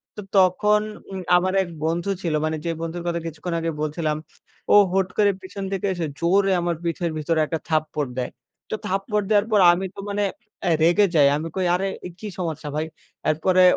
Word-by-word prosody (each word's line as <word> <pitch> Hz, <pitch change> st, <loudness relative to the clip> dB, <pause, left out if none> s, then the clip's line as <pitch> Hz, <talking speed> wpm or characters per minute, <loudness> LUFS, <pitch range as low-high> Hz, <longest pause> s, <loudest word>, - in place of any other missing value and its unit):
তো 210 Hz, -, -6 dB, 0.2 s
তখন 210 Hz, +3 st, +4 dB, 0.3 s
উম 190 Hz, -, -4 dB, 0.2 s
আমার 185 Hz, +1 st, 0 dB
এক 180 Hz, -, -8 dB, 0.2 s
বন্ধু 170 Hz, +4 st, -1 dB
ছিল 170 Hz, -4 st, -1 dB
মানে, 155 Hz, 0 st, -1 dB
যে 170 Hz, -, 0 dB
বন্ধুর 165 Hz, +1 st, -4 dB
কথা 170 Hz, 0 st, 0 dB
কিছুক্ষণ 165 Hz, +2 st, -5 dB
আগে 165 Hz, 0 st, -1 dB
বলছিলাম। 155 Hz, 0 st, -1 dB, 0.6 s
ও -, -, +8 dB, 0.2 s
হট 190 Hz, -1 st, +2 dB
করে 205 Hz, -1 st, +5 dB
পেছন 190 Hz, +1 st, -7 dB
থেকে 195 Hz, +1 st, -1 dB
এসে 170 Hz, -3 st, -2 dB
জোরে 195 Hz, +3 st, +3 dB
আমার 170 Hz, 0 st, 0 dB
পিঠের 170 Hz, 0 st, -1 dB
ভিতরে 160 Hz, +1 st, 0 dB
একটা 160 Hz, +1 st, -3 dB
থাপ্পড় 155 Hz, -3 st, 0 dB
দেয়। 125 Hz, -, -2 dB, 0.4 s
তো -, -, -1 dB
থাপ্পড় 195 Hz, +2 st, 0 dB
দেয়ার 210 Hz, 0 st, +4 dB
পর 210 Hz, -, +5 dB
আমি 190 Hz, +2 st, -2 dB
তো -, -, -9 dB
মানে 205 Hz, 0 st, 0 dB, 0.4 s
অ্যা 180 Hz, -, +2 dB
রেগে 175 Hz, +5 st, +5 dB
যাই। 145 Hz, -2 st, +6 dB
আমি 160 Hz, -, -4 dB
কই 185 Hz, -1 st, 0 dB
"আরে 195 Hz, +2 st, -1 dB, 0.3 s
কি 215 Hz, -, -6 dB
সমস্যা 160 Hz, -4 st, -3 dB
ভাই।" 155 Hz, +1 st, 0 dB, 0.4 s
এরপরে 185 Hz, +4 st, +3 dB
175 Hz, 190 wpm, -23 LUFS, 160-195 Hz, 0.6 s, ও